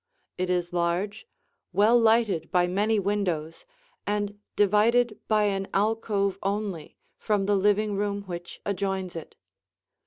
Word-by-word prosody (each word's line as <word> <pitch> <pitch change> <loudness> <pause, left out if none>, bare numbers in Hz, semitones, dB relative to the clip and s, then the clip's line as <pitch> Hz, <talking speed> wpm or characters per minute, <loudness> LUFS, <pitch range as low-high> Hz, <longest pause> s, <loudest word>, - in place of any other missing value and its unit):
It 185 0 -1
is 175 -1 -1
large, 180 - -1 0.5
well 210 +5 +4
lighted 225 -6 +3
by 180 -1 +3
many 205 +5 +1
windows, 190 - -2 0.4
and 205 0 -2 0.2
divided 215 +3 +3
by 215 -1 +3
an 195 -1 0
alcove 200 -2 0
only 195 -5 -3 0.2
from 205 -2 0
the 205 +1 +2
living 205 +1 +2
room 200 0 -2
which 175 -2 -8
adjoins 190 -2 -2
it. 165 - -8
200 Hz, 125 wpm, -26 LUFS, 185-210 Hz, 0.5 s, well